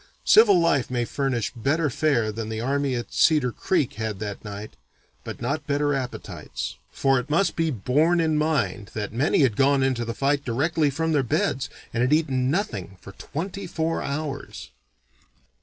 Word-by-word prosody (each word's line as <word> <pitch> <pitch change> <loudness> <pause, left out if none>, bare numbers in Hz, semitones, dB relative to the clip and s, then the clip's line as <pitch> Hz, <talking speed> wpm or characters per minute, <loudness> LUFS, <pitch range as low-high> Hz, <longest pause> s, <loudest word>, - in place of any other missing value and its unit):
Civil 210 -5 +7
life 165 -6 +2
may 120 -1 -1
furnish 130 -3 -2
better 145 +7 +1
fare 120 -6 +1
than 110 0 -5
the 110 0 -3
army 135 +2 0
at 120 - -5
Cedar 150 -6 +3
Creek 160 0 0
had 110 -2 -2
that 100 -1 -6
night, 105 0 -8 0.5
but - - -7
not 145 0 -2
better 145 0 +1
appetites; 130 -2 -5 0.2
for 135 -1 +2
it 125 +3 -7
must 170 +6 +2
be 165 -1 +1
borne 150 - +2
in 160 -2 +2
mind 150 -9 0
that 105 -1 -4
many 135 +6 +2
had 120 -6 +2
gone 135 +1 +3
into 130 -3 0
the 115 0 -4
fight 140 +2 +1
directly 145 +5 +1
from 160 +4 -1
their 145 -3 +3
beds 130 +2 0 0.2
and 120 - 0
had 130 +4 +3
eaten 135 -5 +1
nothing 105 - -2
for 100 - -11
twenty 185 - -6
four 165 -1 -1
hours. 140 - -5
140 Hz, 175 wpm, -24 LUFS, 120-155 Hz, 0.5 s, Civil